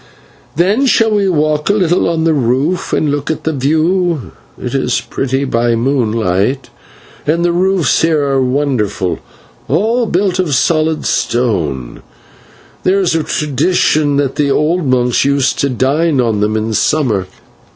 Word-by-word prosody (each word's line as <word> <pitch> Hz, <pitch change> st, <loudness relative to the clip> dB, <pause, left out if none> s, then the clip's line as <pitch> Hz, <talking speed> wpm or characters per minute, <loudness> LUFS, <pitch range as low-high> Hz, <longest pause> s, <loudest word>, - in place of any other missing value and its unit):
Then 200 Hz, -, +2 dB
shall 225 Hz, -3 st, +3 dB
we 200 Hz, -2 st, +1 dB
walk 150 Hz, -2 st, 0 dB
a -, -, +4 dB
little 180 Hz, -4 st, +1 dB
on 165 Hz, -1 st, -1 dB
the 165 Hz, -1 st, +2 dB
roof 140 Hz, +6 st, 0 dB
and 150 Hz, -, 0 dB
look 145 Hz, 0 st, -3 dB
at 160 Hz, -, -3 dB
the 160 Hz, -, -1 dB
view; 160 Hz, +3 st, 0 dB, 0.3 s
it -, -, -5 dB
is -, -, 0 dB
pretty 135 Hz, +1 st, -2 dB
by 120 Hz, -3 st, 0 dB
moonlight, 115 Hz, -2 st, 0 dB, 0.6 s
and 170 Hz, +3 st, +1 dB
the 175 Hz, -, +2 dB
roofs 180 Hz, -4 st, +1 dB
here 160 Hz, -2 st, +2 dB
are 135 Hz, -1 st, +1 dB
wonderful, 125 Hz, -9 st, -1 dB, 0.5 s
all 225 Hz, -, +1 dB
built 185 Hz, 0 st, 0 dB
of 160 Hz, -7 st, +1 dB
solid 155 Hz, +3 st, +1 dB
stone; 80 Hz, -, -1 dB, 0.8 s
there 190 Hz, +2 st, +2 dB
is 185 Hz, -4 st, +1 dB
a 165 Hz, -, +1 dB
tradition 150 Hz, 0 st, 0 dB
that 140 Hz, -2 st, -1 dB
the 145 Hz, -1 st, +1 dB
old 155 Hz, +3 st, +1 dB
monks 125 Hz, -1 st, +2 dB
used 140 Hz, -1 st, +1 dB
to 140 Hz, -, +1 dB
dine 140 Hz, +4 st, +1 dB
on 115 Hz, -4 st, +1 dB
them 105 Hz, +1 st, 0 dB
in 110 Hz, +1 st, -2 dB
summer. 110 Hz, -8 st, 0 dB
145 Hz, 150 wpm, -14 LUFS, 125-170 Hz, 0.8 s, a